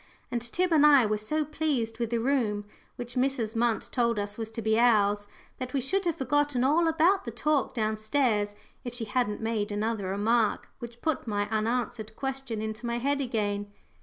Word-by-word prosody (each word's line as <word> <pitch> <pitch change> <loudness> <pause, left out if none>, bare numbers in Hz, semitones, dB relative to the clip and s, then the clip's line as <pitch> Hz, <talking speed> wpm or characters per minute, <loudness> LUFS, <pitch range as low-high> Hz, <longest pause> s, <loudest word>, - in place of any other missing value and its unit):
And 240 - -1
Tib 355 +10 0
and 300 -2 +5
I 285 -5 +7
were 210 0 0
so 305 +8 -1
pleased 275 -7 -2
with 235 -2 -1
the 235 - 0
room 225 -5 0 0.3
which 245 0 -5
Mrs. 250 -4 0
Munt 230 -1 0
told 235 -3 +1
us 205 0 -2
was 225 -1 -5
to 225 +1 -6
be 220 +1 +2
ours, 205 -3 +3 0.3
that 255 -1 -5
we - - +3
should 380 +10 0
have 340 -3 +1
forgotten 290 -2 +1
all 315 +5 +3
about 330 +5 +3
the - - -5
talk 280 +5 0
down 215 -2 0
stairs 215 -3 +1 0.3
if 245 -1 -6
she 235 -2 -3
hadn't 210 -1 -1
made 220 -2 -1
another 210 -1 -1
remark, 215 +3 +1
which 235 0 -9
put 315 -6 -1
my 205 -1 0
unanswered 220 0 -2
question 270 -5 -4
into 220 +2 -4
my 235 0 -1
head 280 +3 0
again. 205 -5 -2
235 Hz, 195 wpm, -28 LUFS, 215-270 Hz, 0.3 s, I